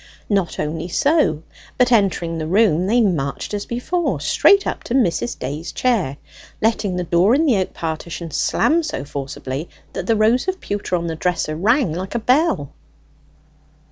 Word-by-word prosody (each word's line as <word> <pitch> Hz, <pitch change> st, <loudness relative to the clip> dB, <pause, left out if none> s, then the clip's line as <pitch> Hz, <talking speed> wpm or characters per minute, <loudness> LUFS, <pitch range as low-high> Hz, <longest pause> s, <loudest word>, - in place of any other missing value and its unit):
Not 195 Hz, -4 st, 0 dB
only 160 Hz, +3 st, -3 dB
so, 230 Hz, -, +2 dB, 0.3 s
but 250 Hz, 0 st, +3 dB
entering 180 Hz, -7 st, +1 dB
the 155 Hz, -, -3 dB
room, 185 Hz, -2 st, +3 dB
they 240 Hz, +4 st, +3 dB
marched 160 Hz, -6 st, -1 dB
as 205 Hz, -1 st, -3 dB
before 325 Hz, +9 st, -1 dB
straight 400 Hz, 0 st, +4 dB
up -, -, -3 dB
to 240 Hz, -, -2 dB
Mrs. 170 Hz, -, +1 dB
Day's 145 Hz, +6 st, -5 dB
chair, 205 Hz, -, 0 dB, 0.4 s
letting 215 Hz, -4 st, 0 dB
the 180 Hz, -, -1 dB
door 175 Hz, +7 st, +3 dB
in 315 Hz, +3 st, +2 dB
the 250 Hz, -9 st, +3 dB
oak 185 Hz, -, -1 dB
partition 165 Hz, +1 st, -5 dB
slam 325 Hz, -, +2 dB
so 300 Hz, -, -4 dB
forcibly, 135 Hz, +1 st, -5 dB, 0.2 s
that -, -, -5 dB
the 225 Hz, -, +3 dB
rows 225 Hz, -, +2 dB
of 375 Hz, 0 st, -1 dB
pewter 205 Hz, -2 st, -3 dB
on 170 Hz, -1 st, -2 dB
the 165 Hz, -1 st, -3 dB
dresser 165 Hz, -2 st, -1 dB
rang 210 Hz, -, +2 dB
like 185 Hz, +6 st, -5 dB
a -, -, +1 dB
bell. 250 Hz, -, +1 dB
190 Hz, 170 wpm, -20 LUFS, 160-240 Hz, 0.4 s, straight